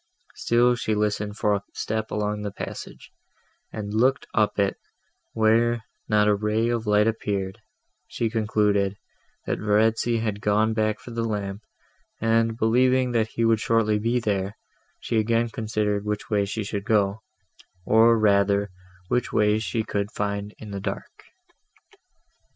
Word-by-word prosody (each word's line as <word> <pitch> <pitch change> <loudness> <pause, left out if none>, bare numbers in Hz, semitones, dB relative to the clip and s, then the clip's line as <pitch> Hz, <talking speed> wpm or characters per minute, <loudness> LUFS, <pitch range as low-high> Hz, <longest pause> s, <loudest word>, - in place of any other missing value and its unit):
Still 120 +1 +3
she 110 -3 -1
listened 105 0 -1
for 105 -2 +2
a 100 -1 -1
step 110 0 -2
along 105 0 -2
the 105 - -3
passage, - - -8 0.6
and 105 -1 -5
looked 130 +5 +2
up 105 -2 +1
it, 100 -1 +1 0.6
where, 115 +1 +2 0.3
not 105 -1 +3
a 105 - +5
ray 105 +3 0
of 115 -2 -2
light 105 0 +4
appearing, 100 -4 -2 0.5
she 115 - -2
concluded, 105 -3 +1 0.5
that - - -2
Verezzi 110 +2 +2
had 110 -2 -2
gone 110 +2 +2
back 110 -1 0
for 120 - -11
the 115 0 -2
lamp; 100 -2 -3 0.6
and, 115 0 +1
believing 125 +3 +3
that 115 -2 +1
he 115 +1 -1
would 115 -1 +3
shortly 110 -1 +2
be 115 +3 +1
there, 100 -3 -2 0.4
she 115 - 0
again 115 +2 +1
considered 105 -2 -1
which 105 +1 -4
way 100 -1 +2
she 105 +2 -3
should 100 0 -4
go, 105 -1 +1 0.6
or 115 +1 +5
rather 100 -1 +2 0.4
which 125 +4 0
way 105 0 +3
she 110 0 -2
could 100 -1 -2
find 100 -1 -3
in 105 -2 -10
the 100 -1 -5
dark. - - -6
110 Hz, 150 wpm, -25 LUFS, 105-115 Hz, 0.6 s, a